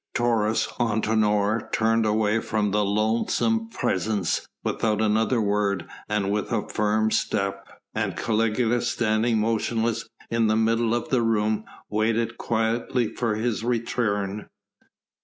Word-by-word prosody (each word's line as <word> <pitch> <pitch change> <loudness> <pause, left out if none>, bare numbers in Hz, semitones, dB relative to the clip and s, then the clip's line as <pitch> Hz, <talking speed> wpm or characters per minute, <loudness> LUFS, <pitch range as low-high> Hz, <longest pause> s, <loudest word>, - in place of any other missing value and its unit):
Taurus 115 -3 +2
Antinor 110 -1 +1
turned 115 0 +2
away 105 +1 +2
from 105 -2 -1
the 105 +1 +2
loathsome 115 - +1
presence 100 - -1 0.2
without 110 -2 0
another 110 +3 +2
word 100 -3 0 0.2
and 105 -2 0
with 105 +3 -2
a 115 -3 -1
firm 110 +1 +1
step. 100 -1 -1 0.3
And - - -2
Caligula, 115 +2 +1
standing 115 -1 +1
motionless 115 +1 0 0.2
in 115 -1 +2
the 110 - +2
middle 115 +1 +2
of 120 - -3
the 130 -3 +2
room 110 -1 +1 0.2
waited 115 +2 0
quietly 115 +1 0
for 115 -3 -1
his 110 0 -1
return. 110 -4 -1
110 Hz, 120 wpm, -25 LUFS, 105-115 Hz, 0.3 s, Taurus